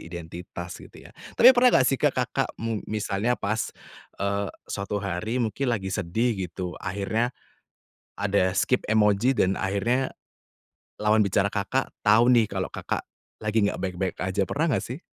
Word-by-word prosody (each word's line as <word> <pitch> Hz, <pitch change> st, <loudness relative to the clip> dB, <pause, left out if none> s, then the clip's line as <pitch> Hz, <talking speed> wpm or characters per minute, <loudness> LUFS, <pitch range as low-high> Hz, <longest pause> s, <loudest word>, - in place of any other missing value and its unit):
identitas 85 Hz, +1 st, -8 dB
gitu -, -, -14 dB
ya. -, -, -14 dB, 0.2 s
Tapi 250 Hz, +2 st, +9 dB
pernah 250 Hz, 0 st, +5 dB
nggak 130 Hz, -, +4 dB
sih, 135 Hz, +1 st, +1 dB
Kakak -, -, +1 dB
mung 115 Hz, -2 st, -3 dB
misalnya 105 Hz, +2 st, 0 dB
pas, 110 Hz, +1 st, -1 dB, 0.5 s
eee, 100 Hz, 0 st, -1 dB, 0.2 s
suatu 100 Hz, +1 st, -4 dB
hari 100 Hz, +3 st, -2 dB
mungkin 125 Hz, +2 st, -1 dB
lagi 95 Hz, -5 st, -1 dB
sedih 110 Hz, +6 st, 0 dB, 0.2 s
gitu, 90 Hz, 0 st, -5 dB
akhirnya, 100 Hz, +5 st, -1 dB, 0.9 s
ada 100 Hz, -2 st, +2 dB
skip 125 Hz, -, +2 dB
emoji 105 Hz, +3 st, +3 dB
dan 95 Hz, +1 st, +3 dB
akhirnya, 115 Hz, +8 st, 0 dB, 0.9 s
lawan 105 Hz, +1 st, +3 dB
bicara 100 Hz, 0 st, +2 dB
Kakak, 100 Hz, +7 st, -1 dB
tahu 115 Hz, +4 st, +5 dB
nih 115 Hz, -3 st, +4 dB
kalau 95 Hz, -1 st, -3 dB
Kakak, -, -, -3 dB, 0.3 s
lagi 110 Hz, -1 st, +1 dB
nggak -, -, -3 dB
baik-baik 95 Hz, -1 st, -3 dB
aja. 95 Hz, +1 st, -1 dB
Pernah 150 Hz, -, 0 dB
nggak -, -, +2 dB
sih? 125 Hz, +5 st, -6 dB
105 Hz, 150 wpm, -26 LUFS, 95-115 Hz, 0.9 s, Tapi